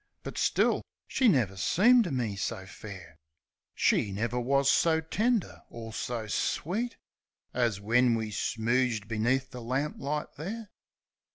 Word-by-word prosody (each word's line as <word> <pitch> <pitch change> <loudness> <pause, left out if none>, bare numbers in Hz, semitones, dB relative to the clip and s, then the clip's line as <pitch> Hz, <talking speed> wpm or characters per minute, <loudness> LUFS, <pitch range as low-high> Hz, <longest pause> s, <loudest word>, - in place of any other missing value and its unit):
But - - -6
still, - - +2 0.3
she 260 - +2
never 120 - +3
seemed 230 - +4
to 175 - -3
me 120 -6 -1
so 95 -1 -3
fair; 95 -5 -10 0.6
She 100 - +2
never 115 +5 -1
wus 140 +3 +2
so 160 +3 +4
tender 215 +7 0
or 115 -1 -8
so 115 -1 -3
sweet 200 - -1 0.6
As 120 -5 +1
when 115 +3 +3
she 110 -1 -4
smooged 115 +1 0
beneath 120 +4 0
the 125 - -7
lamplight 140 +4 -3
there. 210 +8 -6
125 Hz, 130 wpm, -29 LUFS, 110-155 Hz, 0.6 s, seemed